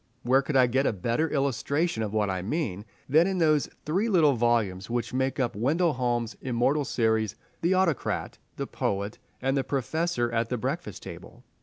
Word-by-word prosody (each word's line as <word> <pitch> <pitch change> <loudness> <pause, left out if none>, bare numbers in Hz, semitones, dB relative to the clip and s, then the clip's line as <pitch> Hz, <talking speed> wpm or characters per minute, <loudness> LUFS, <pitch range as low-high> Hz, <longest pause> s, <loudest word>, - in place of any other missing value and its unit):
Where 130 +3 +4
could 140 +1 -4
I 130 -1 +6
get 120 -6 0
better 120 +8 +1
illustration 140 +1 0
of 105 -2 -2
what 105 -1 +1
I 95 -1 -2
mean 105 - -2 0.2
than 160 +6 +5
in 190 -1 -1
those 155 -4 +3 0.2
three 190 +9 +1
little 160 -8 +5
volumes 115 -6 +1
which 120 0 -2
make 130 +2 0
up 120 -5 0
Wendell 155 - +2
Holmes' 120 -2 -1
immortal 130 +4 +1
series, 110 -4 +1 0.3
"The 175 +3 +2
Autocrat," 185 -6 0 0.2
"The - - -3
Poet," 100 +2 -3 0.2
and 135 +1 +1
"The 135 - +1
Professor 135 -1 -1
at 115 0 0
the 125 - -1
Breakfast 130 - -4
Table"? - - -10
130 Hz, 175 wpm, -27 LUFS, 115-150 Hz, 0.3 s, I